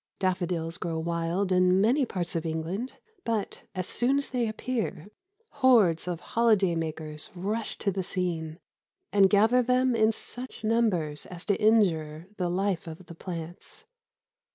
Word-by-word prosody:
Daffodils 175 -3 -1
grow 165 -2 -2
wild 170 +3 -1
in 185 0 +4
many 250 +6 +3
parts 175 -4 -3
of 165 - -1
England, 170 +9 -3 0.3
but, 225 -3 -2
as 185 -1 -2
soon 250 +7 +1
as 280 - -2
they 245 -3 0
appear, 215 -5 -3 0.4
hordes 240 - +4
of 175 -2 -3
holiday 215 -6 +4
makers 155 -2 -4
rush 210 +5 -3
to 200 - 0
the 190 0 -2
scene 170 -4 -3 0.6
and 195 -2 +6
gather 220 +5 +5
them 250 0 +2
in 220 0 +4
such 245 +2 -7
numbers 205 -10 +1
as 180 0 -8
to 200 - 0
injure 170 -8 +2
the 180 -2 -1
life 185 -1 -1
of 165 +3 -9
the 170 - -10
plants. 170 0 -7
185 Hz, 150 wpm, -28 LUFS, 170-225 Hz, 0.6 s, and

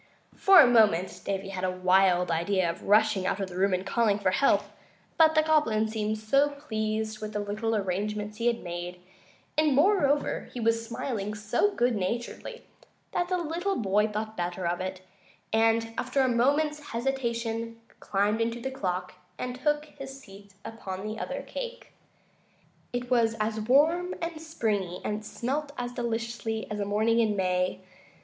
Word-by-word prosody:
For 390 -1 +7
a 310 - +10
moment 210 -7 +3
Davy 195 0 -3
had 190 -1 -5
a 185 - +2
wild 185 -1 +3
idea 180 +2 +1
of 170 - -4
rushing 210 -2 +3
out 195 - -1
of 195 -1 -3
the 175 - -9
room 195 +2 +2
and 185 +1 -1
calling 220 -2 +2
for 200 -3 +1
help; 275 +7 +3 0.5
but 315 -1 +5
the 310 - +5
Goblin 295 -9 +2
seemed 215 0 -1
so 275 +7 +3
pleased 220 -6 -3
with 215 0 -5
the 210 0 -1
arrangements 210 0 -2
he 235 - +1
had 235 -1 0
made, 175 +1 -6 0.6
and, 305 -3 +3
moreover, 295 -3 +2
was 230 -1 +1
smiling 225 -3 -4
so 220 - 0
good 245 0 +2
naturedly, 235 - -4 0.5
that 350 - 0
the 365 - +1
little 350 +4 -2
boy 210 -1 +2
thought 215 +1 -4
better 175 0 -3
of 175 +1 -1
it, 185 0 -4 0.5
and, 225 0 +2
after 275 - 0
a 260 - +3
moment's 290 +5 +2
hesitation, 230 -2 -2 0.2
climbed 205 +3 0
into 230 +1 -1
the 265 +3 -4
clock 185 -7 -3 0.2
and 250 0 -4
took 295 +1 +1
his 275 -2 -10
seat 200 -4 -15
upon 195 -3 -6
the 215 +1 -4
other - - -4
cake. - - -7 1.0
It 245 +1 -4
was 230 -2 +3
as 215 +1 -1
warm 315 +10 +3
and 335 -2 -4
springy, 210 - -2
and 210 0 -2
smelt 280 +7 -3
as 245 0 -3
deliciously, 230 -2 -3
as 210 - -3
a 200 - -1
morning 220 +3 +2
in 220 -2 +2
May. 185 -1 0
225 Hz, 165 wpm, -28 LUFS, 200-265 Hz, 1.0 s, a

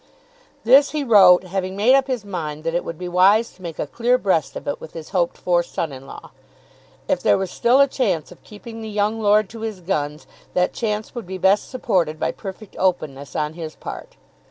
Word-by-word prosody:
This 270 +5 +6
he 295 - 0
wrote, 190 -7 +7
having 185 +1 -3
made 225 +6 +4
up 270 0 +3
his 250 -6 -3
mind 155 -6 -5
that 165 0 -2
it 175 - 0
would 165 - -6
be 180 - -6
wise 195 +6 +4
to 185 - -21
make 170 -3 -7
a - - -2
clear 240 - +1
breast 185 - 0
of - - -8
it 145 - -3
with - - -10
his 160 -2 -8
hoped 175 -3 0
for 175 -1 +1
son 170 -2 -4
in 135 0 -10
law. - - -11 0.8
If - - 0
there - - +4
was 190 -2 -3
still 245 +3 +3
a 280 - +6
chance 215 - -1
of - - -16
keeping 225 +2 -10
the 220 - -6
young 210 +2 -1
lord 210 0 +3
to 230 - -9
his 220 -3 -5
guns 150 -4 -3 0.3
that 180 0 +1
chance 215 -2 -3
would 240 -7 -7
be 190 0 -5
best 190 +2 +2
supported 180 - -1
by - - 0
perfect 195 +1 -10
openness 150 -7 -1
on 150 0 -1
his 160 -2 -7
part. - - -9
190 Hz, 220 wpm, -21 LUFS, 170-220 Hz, 0.8 s, wrote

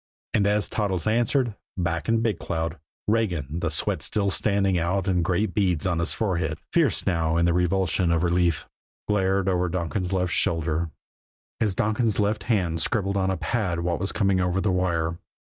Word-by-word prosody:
And 100 -2 +3
as 105 0 +1
Toddles 95 -6 -1
answered, 120 +2 +1 0.2
back 85 -1 -1
in 115 0 +2
Big 110 -6 0
Cloud, 80 -1 -3 0.3
Regan, 85 -9 0
the 85 - -1
sweat 75 - -1
still 100 -2 0
standing 100 -3 +2
out 95 +4 0
in 90 -2 +2
great 90 +3 0
beads 90 -6 +1
on 85 -3 +1
his 85 - +2
forehead, 85 -8 0 0.2
fierce 160 -8 +2
now 80 -3 +1
in 85 - +3
the 85 - +3
revulsion 90 0 +1
of 85 0 +2
relief, 85 -2 +1 0.4
glared 95 -2 +1
over 90 -1 +1
Donkin's 90 +2 -2
left 90 -2 0
shoulder, 80 0 0 0.7
as 105 -4 +1
Donkin's 110 +1 +1
left 105 0 0
hand 90 -8 0
scribbled 100 +2 0
on 95 -1 +1
a 95 - 0
pad 90 -3 -1
what 85 -1 -1
was 95 +2 +1
coming 100 -3 +2
over 90 +1 +1
the 95 0 +1
wire. 85 -2 0
90 Hz, 180 wpm, -25 LUFS, 85-100 Hz, 0.7 s, And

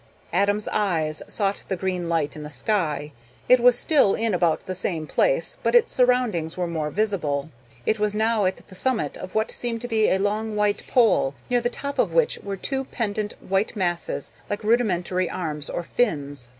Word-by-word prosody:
Adam's 205 +3 +1
eyes 160 -6 0
sought 200 -1 -1
the 190 - -1
green 180 -2 -2
light 160 -3 0
in 155 - -7
the 150 - -7
sky. 155 -5 -1 0.4
It 255 - +6
was 245 0 +5
still 275 -9 +3
in 225 -2 0
about 170 -3 +2
the 185 - -5
same 170 -3 -1
place, - - +1
but - - +1
its 480 - +4
surroundings 245 -11 +1
were 180 - 0
more 160 -3 -2
visible. 160 -7 -1 0.3
It 220 - +1
was 210 0 +1
now 220 -1 +2
at 185 - -2
the 190 - -15
summit 240 +5 -1
of 185 - -9
what 220 0 +1
seemed 230 -2 -1
to 245 - -4
be 220 -2 +2
a 190 - +3
long 210 +2 -1
white 210 -1 +1
pole, 225 - +3 0.2
near 245 -1 +3
the 240 - 0
top 280 +3 -5
of - - +2
which 485 -2 +2
were 200 -1 -5
two 270 +6 -2
pendant 210 -4 -3
white 195 +4 0
masses, 175 -4 0 0.2
like 205 0 -3
rudimentary 185 -6 +1
arms 150 -4 -4
or 175 - -3
fins. 145 - -1
200 Hz, 190 wpm, -24 LUFS, 170-225 Hz, 0.4 s, It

